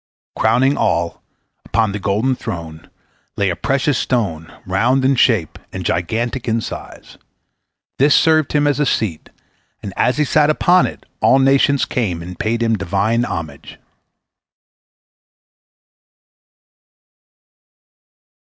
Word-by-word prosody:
Crowning 135 +4 +2
all, 85 0 -1 0.4
upon 110 -3 0
the 105 - -4
golden 105 +7 0
throne, 80 -9 -7 0.5
lay 100 -2 +1
a - - -3
precious 135 0 0
stone, 90 -10 -2
round 120 +8 +1
in 135 +1 +3
shape 110 - +1
and 95 -2 -6
gigantic 115 +10 -2
in 115 0 +1
size. - - -9 0.8
This 145 +2 +5
served 155 -2 +3
him 150 -1 +2
as 145 -1 +1
a 150 - +2
seat, 100 -11 -2 0.5
and 100 -2 -6
as 125 +5 +1
he 150 - +2
sate 150 +1 +3
upon 175 +4 +3
it, - - -10 0.2
all 130 - +5
nations 135 +1 +3
came 90 -9 -2
and 90 +1 -9
paid 115 +2 -1
him 115 -2 0
Divine 100 +5 0
homage. 80 - -7
115 Hz, 120 wpm, -18 LUFS, 95-135 Hz, 0.8 s, This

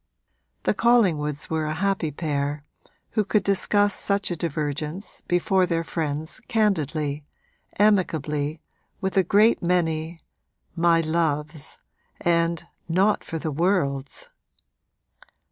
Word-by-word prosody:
The - - +2
Collingwoods 165 - +2
were 160 -1 0
a 155 - -2
happy 195 -2 0
pair 145 -1 -2 0.5
who 215 - +1
could 205 0 +1
discuss 205 +2 +2
such 200 -1 -1
a - - 0
divergence 155 +3 -4
before 180 +1 +2
their 165 -1 0
friends 155 -1 -3
candidly, 155 - 0 0.5
amicably, 160 -7 +1 0.4
with 190 -1 -2
a 195 - +6
great 210 +6 +4
many 165 -2 0 0.6
'My 165 0 +4
loves' 155 -2 -2 0.4
and 170 -1 +1 0.2
'Not 195 +5 +2
for 165 - -5
the 155 0 -3
worlds.' 160 - 0
165 Hz, 110 wpm, -24 LUFS, 150-190 Hz, 0.6 s, a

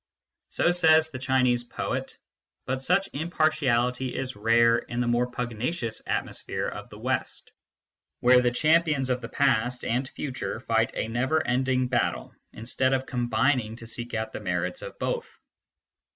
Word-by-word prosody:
So 175 - +2
says 160 -2 +4
the 130 - -6
Chinese 125 -2 +2
poet; 120 - -4 0.5
but 130 0 -2
such 180 +7 +1
impartiality 130 -6 +1
is 130 0 -3
rare 115 +2 +4
in 120 - -5
the 125 - +1
more 120 +1 +1
pugnacious 120 +1 -3
atmosphere - - -3
of - - -7
the - - -11
West, - - -3 0.7
where 125 +1 +6
the 125 - +3
champions 155 0 +2
of 125 0 -1
past 125 -3 +1
and 125 +3 -1
future 130 -5 -4
fight 115 -2 +1
a - - -1
never 130 +7 0
ending 130 0 +1
battle, 120 -1 -1 0.2
instead 130 +3 -1
of 130 0 -2
combining 125 -2 0
to 115 - -10
seek 120 +1 -4
out 110 0 -3
the - - -4
merits 90 -3 -2
of - - -8
both. - - -3
125 Hz, 150 wpm, -26 LUFS, 120-135 Hz, 0.7 s, where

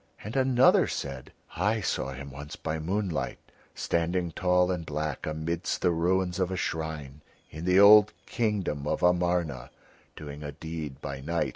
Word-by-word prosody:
And 110 +5 -6
another 130 -1 +5
said: - - -5 0.2
"I 110 +2 +1
saw 65 -8 -2
him 70 +1 -8
once 70 +2 -8
by 80 0 -3
moonlight 95 +1 -2 0.4
standing 85 +1 -1
tall 90 +2 +2
and 90 -2 -2
black 75 -2 -3
amidst 80 +2 -2
the 90 - +4
ruins 90 +2 +1
of 90 -1 +1
a 95 - -3
shrine 75 -4 -4 0.3
in 80 +2 -7
the 90 +1 +4
old 105 +1 +8
kingdom 100 - -1
of - - -1
Amarna, 85 -7 +1 0.5
doing 75 -1 -8
a 75 -1 -6
deed 80 -2 -6
by 70 -1 -5
night. 85 +4 -1
85 Hz, 155 wpm, -28 LUFS, 75-95 Hz, 0.5 s, old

